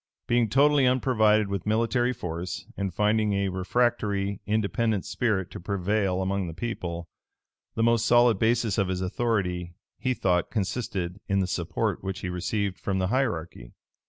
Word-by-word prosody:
Being 120 -2 +2
totally 140 +2 +4
unprovided 110 -5 +3
with 100 -1 -4
military 115 +3 +2
force, 90 -6 -5
and 100 -1 -2
finding 105 +2 +2
a 100 0 0
refractory, 100 0 0
independent 110 0 0
spirit 105 -7 -1
to - - -7
prevail 95 0 0
among 95 -1 -1
the 80 - -7
people, 85 -6 -4 0.7
the 115 - +1
most 115 -1 +3
solid 120 -3 +5
basis 115 -2 +2
of 100 - +2
his 95 0 -2
authority, 90 -4 -1 0.2
he 130 -1 0
thought 90 -5 +1
consisted 95 -3 -3
in 100 - +1
the 95 - +2
support 90 -1 -2
which 95 +1 -4
he 90 - -3
received 95 +2 -2
from 95 -1 -1
the 95 -1 0
hierarchy. 85 - -2
100 Hz, 155 wpm, -27 LUFS, 90-115 Hz, 0.7 s, solid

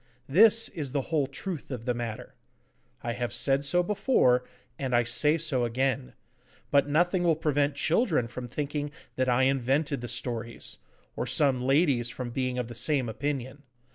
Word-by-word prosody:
This 220 +9 +5
is 145 -6 -5
the 140 -3 -2
whole 145 -4 +2
truth 155 +4 -6
of 125 -4 -6
the 125 - +1
matter. 115 -2 -6 0.7
I 120 - -2
have 120 0 -3
said 140 0 +1
so 175 +6 +3
before, 175 - +2 0.4
and 130 -3 -1
I 120 - +4
say 150 +7 +2
so 150 -6 0
again. 130 +2 -1 0.6
But 140 0 +4
nothing 175 +4 +2
will 170 -2 +3
prevent 145 -2 0
children 160 - +1
from 125 +1 -7
thinking 145 +3 -3 0.3
that 130 0 0
I 125 +1 +3
invented 135 +2 +1
the 120 - -5
stories, 120 -1 -4 0.4
or - - -3
some 135 -4 +3
ladies 135 -3 +2
from 120 0 -6
being 130 0 -2
of 125 -2 -2
the 120 - -8
same 130 +2 +2
opinion. 130 +3 -4
135 Hz, 170 wpm, -28 LUFS, 125-150 Hz, 0.7 s, This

